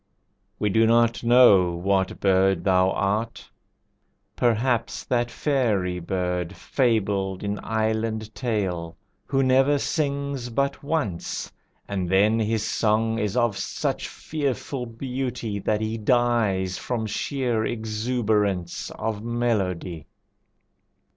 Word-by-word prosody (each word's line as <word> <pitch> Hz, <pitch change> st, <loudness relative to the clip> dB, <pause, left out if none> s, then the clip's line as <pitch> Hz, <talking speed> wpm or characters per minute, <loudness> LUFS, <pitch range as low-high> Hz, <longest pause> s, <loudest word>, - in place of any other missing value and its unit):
We 105 Hz, -1 st, 0 dB
do 110 Hz, +2 st, +4 dB
not 115 Hz, 0 st, +3 dB
know 110 Hz, -8 st, +6 dB
what 95 Hz, +2 st, 0 dB
bird 95 Hz, -2 st, +3 dB
thou 95 Hz, -1 st, +3 dB
art. 105 Hz, +4 st, -1 dB, 0.9 s
Perhaps 120 Hz, 0 st, +1 dB
That 120 Hz, -1 st, 0 dB
fairy 105 Hz, -12 st, 0 dB
bird, 90 Hz, 0 st, -2 dB
fabled 100 Hz, -7 st, 0 dB
in 100 Hz, 0 st, -2 dB
island 110 Hz, 0 st, -1 dB
tale, 90 Hz, -9 st, -2 dB, 0.3 s
Who 135 Hz, 0 st, +1 dB
never 135 Hz, +2 st, +4 dB
sings 140 Hz, -3 st, -2 dB
but 140 Hz, +4 st, -1 dB
once, 140 Hz, -, -2 dB, 0.4 s
and 95 Hz, -3 st, -2 dB
then 105 Hz, +4 st, +3 dB
his 110 Hz, 0 st, 0 dB
song 110 Hz, +1 st, +1 dB
Is 105 Hz, +1 st, -1 dB
of 120 Hz, -4 st, +2 dB
such -, -, -2 dB
fearful 140 Hz, -3 st, -3 dB
beauty 125 Hz, -3 st, -4 dB
that 105 Hz, +2 st, 0 dB
he 110 Hz, +1 st, -2 dB
dies 110 Hz, -5 st, +1 dB
From 120 Hz, -3 st, -2 dB
sheer 120 Hz, +1 st, -1 dB
exuberance 110 Hz, -5 st, -1 dB
of 110 Hz, -2 st, -3 dB
melody. 100 Hz, -9 st, -1 dB
110 Hz, 110 wpm, -24 LUFS, 95-120 Hz, 0.9 s, know